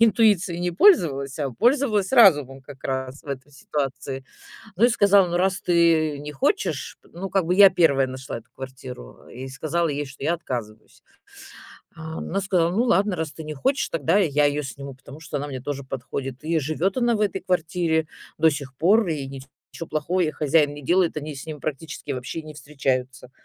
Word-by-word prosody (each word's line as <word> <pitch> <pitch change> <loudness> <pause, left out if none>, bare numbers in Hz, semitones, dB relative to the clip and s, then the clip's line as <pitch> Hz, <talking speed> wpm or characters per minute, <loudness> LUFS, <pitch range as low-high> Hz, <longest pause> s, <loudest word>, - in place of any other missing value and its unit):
интуицией 205 -6 +3
не 175 0 0
пользовалась, 160 - +3
а 140 -3 -1
пользовалась 225 - +2
разумом 145 - +5
как 135 -1 -13
раз 130 0 -3
в - - -24
этой 140 +1 -7
ситуации. 135 -1 -4 0.5
Ну 215 - +4
и - - +7
сказала: 200 -5 +4
"Ну, 175 - -1
раз 190 +2 +1
ты 165 -5 +2
не 150 0 -7
хочешь" 390 - -1 0.2
Ну 190 +3 -5
как 190 0 +1
бы 175 +2 +1
я 195 0 +9
первая 150 -7 +3
нашла 130 -1 -6
эту 115 - -17
квартиру. 130 - -10
И 130 +2 -8
сказала 155 +5 -1
ей, 145 -1 -2
что 140 +1 -10
я 170 - +2
отказываюсь. 115 -9 -7 0.9
А 160 -1 -7
она 195 - -2
сказала: 180 -3 +1
"Ну 205 +7 +1
ладно, 200 -4 +2
раз 160 -2 -3
ты 160 - -9
не 155 0 -5
хочешь, 270 - 0
тогда 165 +5 +1
я 150 -6 +2
её 145 +1 0
сниму, 140 0 -8
потому 140 +3 -13
что 160 -1 -6
она 145 +1 -3
мне 135 -3 -6
тоже 140 -1 -4
подходит". 130 0 -6
И 165 +1 +1
живёт 160 +6 -1
она 240 -1 +2
в - - -4
этой 200 -2 0
квартире 165 -2 0 0.3
до 160 +1 +5
сих 140 -2 -6
пор, 200 - +4
и 150 -4 -2
ничего 135 +4 -10
плохого 155 +5 -1
ей 160 -3 +1
хозяин 150 -1 +2
не 145 - -10
делает. 175 +4 +2
Они 150 0 -5
с 135 - -9
ним 155 -2 -7
практически 150 0 -5
вообще 130 +5 -5
не 155 0 -10
встречаются. 130 -4 -3
155 Hz, 190 wpm, -24 LUFS, 135-180 Hz, 0.9 s, я